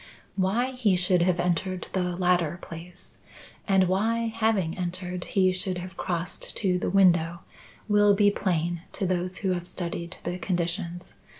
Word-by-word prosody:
"Why 210 +7 +1
he 235 -7 +2
should 180 0 +2
have 180 0 +2
entered 180 +1 -1
the 180 -2 0
latter 175 -2 +1
place, 170 +1 -10 0.5
and 190 -2 +4
why, 225 +4 0
having 215 -7 +1
entered 180 0 -4
he 185 -2 +3
should 185 0 -3
have 185 +1 -7
crossed 175 -1 -3
to 185 -3 +1
the - - -1
window, 175 -3 +3 0.5
will 205 -1 +5
be 205 0 +4
plain 175 -4 -1
to 195 - -2
those 185 0 -1
who 190 -2 0
have 175 -1 -2
studied 170 -1 -5
the 175 +2 -3
conditions. 175 -1 -3
180 Hz, 155 wpm, -27 LUFS, 175-195 Hz, 0.5 s, will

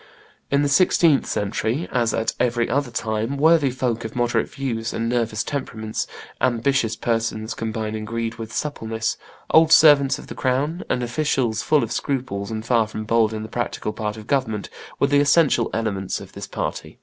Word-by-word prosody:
In 140 +1 +2
the - - +2
sixteenth 160 -1 +4
century, 110 - -1
as 120 -2 +1
at 115 0 0
every 120 -1 +1
other 140 +1 0
time, 115 +3 -2
worthy 155 -1 +4
folks 125 -2 -2
of 110 - -7
moderate 120 0 +1
views 120 -4 -3
and 115 - -2
nervous 115 -3 0
temperaments, 110 -6 -4 0.3
ambitious 120 -1 +1
persons 115 -1 -1
combining 110 -1 -3
greed 115 +1 -3
with 115 0 -6
suppleness, 115 -7 -2 0.4
old 160 0 +6
servants 145 -4 +6
of - - -10
the - - -8
crown, 140 +6 -1
and 125 - 0
officials 120 -3 0
full 150 -2 +3
of - - -4
scruples 120 -8 -2
and 110 0 -4
far 115 -2 +2
from 110 0 -6
bold 110 0 +2
in 110 -1 -4
the - - -6
practical 115 -2 -3
part 105 0 -4
of 110 - -10
government, 115 -7 -1 0.3
were - - +4
the 145 0 +3
essential 145 -4 +3
elements 100 -4 -2
of - - -11
this - - -7
party. - - -5
115 Hz, 175 wpm, -22 LUFS, 110-140 Hz, 0.4 s, old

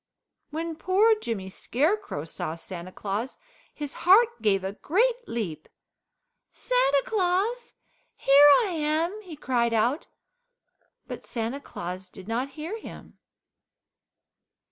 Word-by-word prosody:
When 325 +1 -4
poor 395 +6 +4
Jimmy 195 - -4
Scarecrow 280 - -1
saw 160 0 -5
Santa 175 +1 -8
Claus 210 +7 -4 0.3
his 290 -2 -6
heart 415 - +5
gave 195 -3 +2
a 190 +1 -3
great 470 - 0
leap. 175 -10 -4 0.8
"Santa - - +2
Claus! 435 +2 0 0.4
Here 285 +2 +7
I 415 - -2
am!" 325 +5 -1
he 360 -6 -10
cried 240 -5 0
out, 245 +8 +1 1.0
but - - -7
Santa 235 +3 -3
Claus 180 -5 -7
did 190 +1 -12
not 250 +5 -2
hear 340 +9 -5
him. - - -12
290 Hz, 115 wpm, -26 LUFS, -, 1.0 s, Here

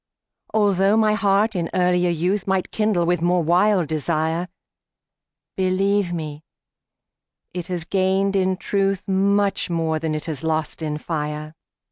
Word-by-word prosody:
Altho' 200 -1 +3
my 215 -1 +3
heart 210 +1 +2
in 170 -2 -1
earlier 180 -1 +2
youth 180 +5 -1
Might 190 -1 0
kindle 210 -5 +1
with 175 -1 +1
more 175 0 +2
wild 180 +1 +3
desire, 160 +2 -1 1.1
Believe 190 0 +1
me, 155 -3 -5 1.1
it 175 -1 -5
has 180 -3 -3
gained 195 +1 +1
in 190 -1 +1
truth 195 +1 -1
Much 200 +1 +1
more 165 -2 0
than 155 -1 -2
it 155 - -4
has 155 -4 -5
lost 160 0 -2
in 150 -1 -2
fire. 150 -1 -4
180 Hz, 135 wpm, -22 LUFS, 160-195 Hz, 1.1 s, Altho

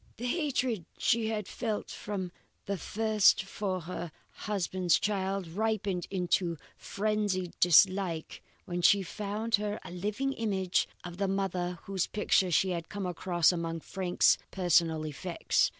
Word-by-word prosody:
The 240 - -5
hatred 250 - 0
she 225 -1 +2
had 215 -3 -2
felt 220 -4 -3
from 190 -4 -4 0.3
the 200 - -1
first 215 0 +3
for 195 -1 -3
her 170 0 -6 0.2
husband's 185 -3 0
child 195 -2 -1
ripened 200 -1 -1
into 180 -2 0 0.2
frenzied 205 -3 -1
dislike 180 -1 +3 0.2
when 175 0 -3
she 195 +3 +5
found 210 +4 -4
her 210 0 -2
a - - -9
living 210 +10 -2
image 195 -7 0 0.2
of 175 0 -8
the 200 0 0
mother 185 -2 -1
whose 195 -2 -1
picture 195 -3 +2
she 185 +2 +3
had 170 -2 -4
come 205 -2 -4
across 175 -1 +2
among 165 -2 -3
Frank's 180 0 +2
personal 165 -3 +2
effects. 165 +4 0
190 Hz, 135 wpm, -30 LUFS, 175-210 Hz, 0.3 s, she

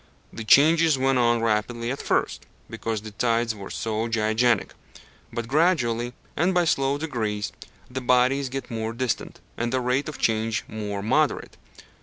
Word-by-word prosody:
The 115 - -6
changes 160 +5 +5
went 135 0 +2
on 120 -1 +2
rapidly 115 +2 0
at 140 - -4
first, - - -1 0.2
because 110 -2 -3
the 110 - -8
tides 115 +1 0
were 100 -2 -9
so 110 0 -2
gigantic; 115 0 +1 0.6
but 120 -1 -4
gradually, 125 -6 +1 0.2
and 180 +4 +1
by 175 -1 +3
slow 135 -2 +1
degrees, 110 -9 -3 0.4
the 130 +1 -5
bodies 125 +2 +2
get 135 0 -6
more 110 0 -3
distant, 125 0 -3 0.2
and 120 0 -1
the 130 - +1
rate 125 +4 0
of 150 - -7
change 110 0 0
more 105 -2 -5
moderate. 145 +7 +1
120 Hz, 155 wpm, -25 LUFS, 110-135 Hz, 0.6 s, changes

